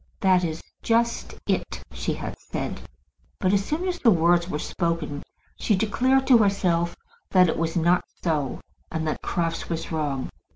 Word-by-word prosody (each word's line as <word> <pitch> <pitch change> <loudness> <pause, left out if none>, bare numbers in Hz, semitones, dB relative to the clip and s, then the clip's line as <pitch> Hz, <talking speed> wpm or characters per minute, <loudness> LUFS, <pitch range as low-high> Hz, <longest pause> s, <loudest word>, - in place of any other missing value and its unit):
"That 185 -2 +4
is 160 -1 -3 0.2
just 235 +1 +1
it," - - -2
she - - -2
had - - -5
said. - - -5 0.6
But 185 0 +2
as 200 -1 +3
soon 320 - -2
as 355 -1 -2
the 235 - +5
words 175 -1 +3
were 150 - -1
spoken 165 -3 -2 0.4
she 210 - +2
declared 255 +7 +2
to 250 -3 +7
herself 180 -5 +2 0.3
that 185 -1 +5
it - - 0
was 165 0 -1
not 175 +1 +3 0.2
so, 150 -6 -1 0.3
and 160 -1 -2
that 155 - -2
Crofts 165 -1 -2
was 165 0 -3
wrong. 145 -4 -2
175 Hz, 165 wpm, -25 LUFS, 165-205 Hz, 0.6 s, to